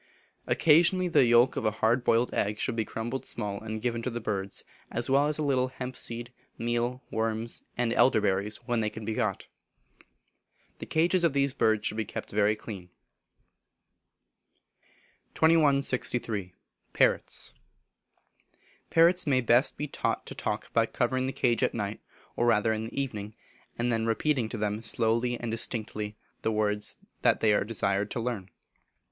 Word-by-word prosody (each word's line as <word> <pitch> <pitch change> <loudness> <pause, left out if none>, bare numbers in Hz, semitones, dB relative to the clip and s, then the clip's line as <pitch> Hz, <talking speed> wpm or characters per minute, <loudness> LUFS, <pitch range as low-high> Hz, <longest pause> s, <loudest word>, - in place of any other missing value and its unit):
Occasionally 175 +3 +4
the 165 - +5
yolk 120 +2 +5
of - - -2
a 110 - +3
hard 120 +3 +2
boiled 115 0 +2
egg 105 +1 0
should 115 - -2
be 110 -1 -1
crumbled 120 +5 -4
small 100 -3 -4
and 110 0 -5
given 120 -1 -1
to 130 - -2
the 120 -1 -4
birds, 100 -3 -4 0.3
as 120 +3 0
well 140 +2 +4
as 150 - +1
a 155 - -1
little 130 -3 +2
hemp 130 0 -6
seed, 120 +1 -2 0.2
meal, 120 +2 -1
worms, 110 +1 -2 0.2
and 120 -1 +1
elder 125 -2 +4
berries 100 +1 0
when 120 -2 0
they 105 - 0
can 110 0 -8
be 110 - -2
got. 110 -5 -1 1.3
The - - -7
cages 170 +3 +2
of 165 -4 +3
these 140 -1 +1
birds 110 -5 +1
should 105 - -1
be 110 - 0
kept - - -6
very 105 +1 +2
clean. 100 -4 -9 2.5
2163. 135 - +2 0.4
Parrots. - - +1 1.4
Parrots 175 +1 +4
may 135 -3 +3
best 120 +2 +3
be 150 - -3
taught - - -2
to - - -7
talk - - -4
by 115 0 +3
covering 130 +2 0
the - - -1
cage 120 -4 +1
at - - +1
night, 105 -2 -3 0.4
or 120 - +1
rather 110 -1 +3
in 110 0 -3
the 115 - -5
evening, 110 -6 -4 0.4
and 120 0 0
then 115 0 0
repeating 120 0 +1
to 115 - -5
them 105 0 -2
slowly 115 +2 0
and 120 -2 -4
distinctly, 110 -2 -3 0.2
the 110 - 0
words 105 -1 0 0.2
they 110 -2 +3
are - - +2
desired 100 -1 0
to - - -3
learn. 115 -5 -3
115 Hz, 165 wpm, -28 LUFS, 110-130 Hz, 2.5 s, the